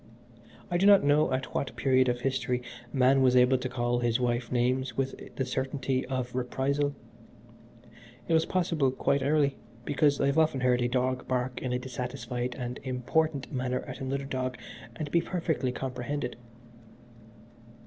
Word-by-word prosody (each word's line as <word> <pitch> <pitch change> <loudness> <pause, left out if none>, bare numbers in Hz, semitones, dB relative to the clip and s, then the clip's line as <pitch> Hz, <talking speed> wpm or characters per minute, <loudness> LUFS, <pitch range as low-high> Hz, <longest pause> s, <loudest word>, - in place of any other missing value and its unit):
I 175 - +2
do 195 - +4
not 200 -4 +7
know 145 0 +3
at 130 0 -2
what 140 - -2
period 130 -1 +3
of 120 0 -1
history 125 -2 -1 0.3
man 135 +1 +4
was 130 -1 +4
able 125 +1 +5
to 130 - -3
call 120 -1 0
his 120 0 +1
wife 120 -1 -1
names 125 0 0
with 135 0 0 0.2
the 130 - -1
certainty 130 0 -2
of 130 -2 -3
reprisal. 140 +3 -1 1.3
It - - +1
was 160 0 +3
possible 165 -7 +1
quite 135 +2 0
early, 140 0 +2 0.3
because 145 0 +2
I - - +2
have 140 +3 +2
often 155 -4 +2
heard 125 -1 +3
a 120 - +2
dog 130 +1 -1
bark 125 0 -1
in 130 - -2
a 125 - +1
dissatisfied 125 -1 -4
and 125 0 -4
important 135 +3 -1
manner 125 -1 -1
at 130 -1 -8
another 135 +1 -2
dog 130 -2 -3 0.4
and 150 -3 -5
be 170 - +4
perfectly 165 -7 -1
comprehended. 125 +1 -4
130 Hz, 160 wpm, -29 LUFS, 125-140 Hz, 1.3 s, not